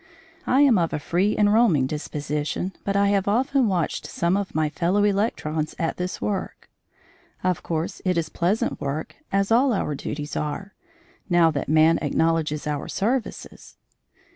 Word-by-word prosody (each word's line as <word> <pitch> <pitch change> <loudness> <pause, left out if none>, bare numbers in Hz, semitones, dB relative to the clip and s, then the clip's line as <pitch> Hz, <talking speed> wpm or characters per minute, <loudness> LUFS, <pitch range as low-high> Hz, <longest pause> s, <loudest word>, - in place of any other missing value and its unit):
I 265 +2 +4
am 260 -9 +5
of 165 -1 0
a - - -1
free 180 +7 0
and 205 -1 +4
roaming 205 - +4
disposition, 150 +4 -3
but 200 - -1
I 200 0 +3
have 200 -1 +1
often 255 +4 +2
watched 180 -5 -1
some 170 +2 0
of 200 -4 -3
my 155 -1 +2
fellow 180 +6 +1
electrons 195 -7 -1
at 165 - -2
this 180 0 -4
work. 200 -3 -4 0.7
Of 180 -1 0
course, 160 0 -3
it 180 -2 +1
is 165 -2 0
pleasant 180 +7 -1
work, 140 +3 -4
as 195 +2 +1
all 255 +4 +4
our 170 -7 -1
duties 145 +1 -5
are, 175 +7 -4 0.6
now 170 -2 +4
that 140 -2 -3
man 155 +1 +4
acknowledges 155 0 0
our 150 -2 -3
services. 240 +5 -3
175 Hz, 160 wpm, -24 LUFS, 155-200 Hz, 0.7 s, am